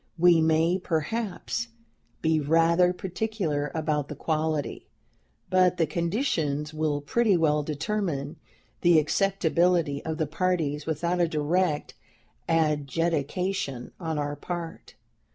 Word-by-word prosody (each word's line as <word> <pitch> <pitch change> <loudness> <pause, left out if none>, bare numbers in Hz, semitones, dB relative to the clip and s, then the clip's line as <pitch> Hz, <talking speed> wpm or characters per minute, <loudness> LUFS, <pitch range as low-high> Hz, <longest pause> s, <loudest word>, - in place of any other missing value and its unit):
We 170 -1 +5
may, 160 +3 +3
perhaps, 160 - -2 0.6
be 160 0 +3
rather 165 +4 +3
particular 180 -6 -2
about 150 -2 -1
the - - -7
quality; 155 -2 -2 0.6
but 185 -1 +3
the 165 - +3
conditions 160 - -1
will 155 -2 -1
pretty 205 +6 +2
well 150 -2 +2
determine 155 -1 -3 0.4
the 175 -2 +5
acceptability 170 -2 +2
of 160 -1 -3
the 160 - 0
parties 155 -2 -1
without 170 +3 0
a 170 - +3
direct 155 +1 0 0.6
adjudication 155 -1 0
on 160 -3 -3
our 145 0 -2
part. 170 +2 -7
160 Hz, 110 wpm, -27 LUFS, 150-180 Hz, 0.6 s, We